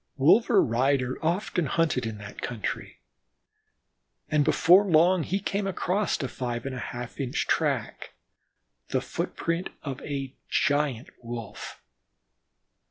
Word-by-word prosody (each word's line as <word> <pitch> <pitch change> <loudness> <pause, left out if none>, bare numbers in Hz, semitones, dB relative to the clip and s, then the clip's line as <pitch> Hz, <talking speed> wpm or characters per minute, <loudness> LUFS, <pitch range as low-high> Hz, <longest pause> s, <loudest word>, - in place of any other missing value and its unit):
Wolver 200 - +5
Ryder 130 +3 +1
often 175 -1 0
hunted 145 -6 +1
in 110 -1 -5
that 100 0 -9
country, 120 -4 -4 1.3
and 150 -1 +3
before 180 +7 +6
long, 180 0 +4
he 190 +5 -1
came 200 0 -2
across 195 +2 0
a - - -1
five 120 -2 -4
and 135 - -3
one 125 - -5
half 120 +1 -7
inch 130 -3 -1
track, - - -1 0.7
the - - 0
foot - - -4
print 170 +2 -1
of 135 -2 -5
a 135 -2 -4 0.2
giant 145 -4 +1
Wolf. 115 -3 -7
140 Hz, 125 wpm, -27 LUFS, 125-175 Hz, 1.3 s, before